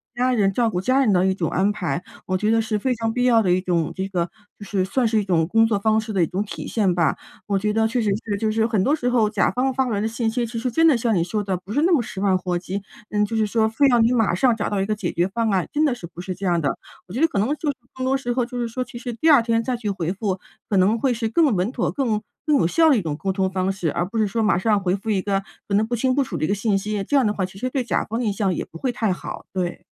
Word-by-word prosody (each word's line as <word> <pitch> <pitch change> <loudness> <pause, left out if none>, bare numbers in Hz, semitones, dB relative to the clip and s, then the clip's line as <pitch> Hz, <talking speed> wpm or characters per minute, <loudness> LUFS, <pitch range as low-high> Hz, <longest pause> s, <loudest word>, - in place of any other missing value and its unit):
家 250 +1 +1
人 200 -5 +2
照 235 +2 +2
顾 180 -4 -2
家 255 +8 +2
人 255 -6 +3
的 185 -1 +3
一 190 - +2
种 175 -4 -2
安 195 +3 +1
排。 175 -5 -3 0.2
我 185 - 0
觉 210 +3 0
得 225 0 +3
是 220 -1 -1
非 255 +5 0
常 225 0 -1
必 250 +1 0
要 240 -2 +5
的 185 -4 +1
一 180 - +3
种 175 -3 0
这 190 0 -3
个 175 -3 -1 0.3
就 - - -8
是 195 -2 -1
算 240 +5 +1
是 220 -1 +2
一 - - 0
种 165 -4 +2
工 225 +5 +4
作 220 -3 +1
方 220 +1 +2
式 220 0 -5
的 190 - +1
一 - - +1
种 190 +5 -2
体 - - -7
现 200 -5 +1
吧。 170 -4 +1 0.3
我 200 -1 +1
觉 210 +2 0
得 220 0 +2
确 230 +2 -1
实 215 -3 +1
是 205 -2 -2
就 215 +1 0
是 220 +1 +1
很 215 -5 +1
多 285 +8 +3
时 245 -5 -1
候 235 -3 +3
甲 210 -1 +1
方 260 +1 0
发 265 +1 +1
过 245 - -2
来 - - -1
的 215 - 0
信 225 0 -1
息， 240 +1 -1
其 230 0 -5
实 250 +2 -1
真 325 +7 +2
的 305 - +5
像 230 -2 +1
你 170 - +2
说 205 +4 -2
的 190 -2 -1
不 190 +4 -9
是 290 - +2
那 345 +4 +3
么 330 - +5
十 195 - -7
万 195 -2 +3
火 180 -1 -2
急， 190 +2 -4 0.3
嗯 210 0 +1
就 225 - -4
是 220 -1 +2
说 220 +1 +2
非 225 +6 +3
要 245 -3 +4
你 230 +1 +4
马 225 -7 +2
上 240 +5 +3
找 215 - -2
到 205 - -1
一 - - 0
个 215 - 0
解 195 -4 -3
决 175 +2 +1
方 225 +3 -1
案， 190 -3 +1
真 300 - +2
的 285 -5 +2
是 185 - -9
不 170 +1 -10
是 185 0 -5
这 195 - -6
样 175 -2 +2
的。 140 - -1 0.3
我 180 - -10
觉 245 - -3
得 325 - +5
可 205 - -2
能 210 - +2
就 305 0 -3
是 - - -11 0.2
更 260 0 -3
多 265 +1 +2
时 265 -3 -2
候 250 -1 0
就 245 0 -6
是 240 - -1
说 255 +3 -3
其 240 - -10
实 245 -1 -5
第 315 +8 +3
2 285 - +7
天 230 0 0
再 250 +2 -1
去 230 -3 -4
回 180 -3 -2
复， 195 -2 -2 0.3
可 200 - +2
能 200 +5 +3
会 265 +2 +1
是 230 -1 -1
更 270 +1 +3
稳 185 +5 0
妥、 250 - -1
更 230 -7 -1 0.2
更 300 -2 +3
有 165 - +2
效 320 - +4
的 270 - +4
一 - - 0
种 155 -4 -3
沟 195 +4 -2
通 190 -1 0
方 185 0 -1
式， 180 -5 -2
而 175 - -1
不 225 +5 -3
是 215 - +2
说 220 +3 -1
马 195 -5 +3
上 210 +1 +2
回 185 -1 0
复 200 +3 -6
一 195 -3 +1
个 195 -1 0 0.3
可 200 - -3
能 210 +2 +2
不 240 - -1
清 255 +2 +1
不 280 +1 +2
楚 - - -5
的 - - 0
一 - - -1
个 - - +1
信 205 0 +1
息， 205 0 -2
这 285 - +1
样 265 - +3
的 210 - +1
话 190 -3 -2
其 190 +1 -14
实 255 - -2
对 265 -1 -1
甲 240 - -1
方 225 +2 -3
的 245 - -1
印 - - +2
象 195 -2 0
也 - - -3
不 165 - -12
会 250 +9 -1
太 220 -4 -1
好， 180 - -6
对。 180 -2 -3
215 Hz, 360 characters per minute, -22 LUFS, 190-240 Hz, 0.3 s, 2